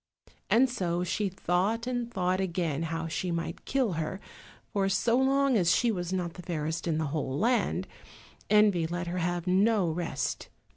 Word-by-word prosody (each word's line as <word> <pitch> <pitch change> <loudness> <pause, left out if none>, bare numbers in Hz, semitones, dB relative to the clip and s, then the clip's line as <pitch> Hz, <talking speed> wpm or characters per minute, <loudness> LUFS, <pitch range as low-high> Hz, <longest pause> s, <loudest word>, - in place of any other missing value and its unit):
And 255 +3 +5
so 180 -8 -1
she 195 +3 -1
thought 190 +5 0
and 245 -1 -2
thought 185 -2 0
again 170 -5 -1
how 165 0 -3
she 175 +3 -2
might 165 -1 -4
kill 260 -6 +1
her, 165 +4 -3 0.5
for 195 -1 +1
so 230 +5 +2
long 270 0 +3
as 175 -5 +4
she 240 -2 +2
was 175 -3 -3
not 180 -3 -2
the 180 - -9
fairest 165 -1 -3
in 160 -2 +1
the 160 - 0
whole 140 -4 -2
land, 235 +6 +1 0.6
envy 205 -6 +4
let 175 +1 -3
her 175 +1 -3
have 175 0 -1
no 190 -1 +3
rest. 155 -4 -3
180 Hz, 175 wpm, -29 LUFS, 170-215 Hz, 0.6 s, And